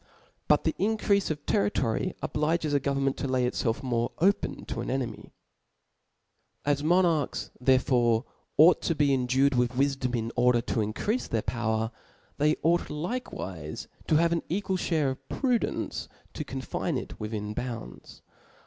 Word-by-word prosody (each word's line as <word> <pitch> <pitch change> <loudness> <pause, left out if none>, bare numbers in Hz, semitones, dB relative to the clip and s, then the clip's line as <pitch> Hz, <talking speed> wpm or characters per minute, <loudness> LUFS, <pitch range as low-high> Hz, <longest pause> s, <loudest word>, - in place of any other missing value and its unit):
But - - +4
the - - +1
increafe 200 -1 +2
of 150 -2 -4
terri 100 +1 +2
tory 130 +9 -1
obliges 155 0 0
a 145 - +4
government 135 0 0
to 140 - -2
lay 130 -1 +1
icfelf 120 +1 -1
more 120 -2 0
open 195 +5 +1
to 115 - -4
an - - -5
enemy^ 130 -2 -3 1.4
As 145 0 +1
Monarchs 170 -3 +2
therefore 125 -3 +3 0.3
ought 165 +4 +7
to 165 - 0
be 145 -2 +3
endued 130 +2 +2
with 125 0 +1
wlfdom 135 -1 0
in 115 0 -2
order 125 -1 +4
totncreafe 115 - -1
their 110 -2 0
power, 110 -1 -1 0.5
theyougho 155 +3 +2 0.3
likewife 80 - -7 0.2
to 155 - +3
have 170 +2 +4
an 170 - +1
equal 190 +1 0
(hare 155 -6 +1
of 130 - -10
prudence 250 -4 -1 0.2
to - - -4
con, - - -5
fine - - -2
it - - -7
within 105 -1 -4
bounds. 115 - -7
135 Hz, 150 wpm, -28 LUFS, 120-160 Hz, 1.4 s, ought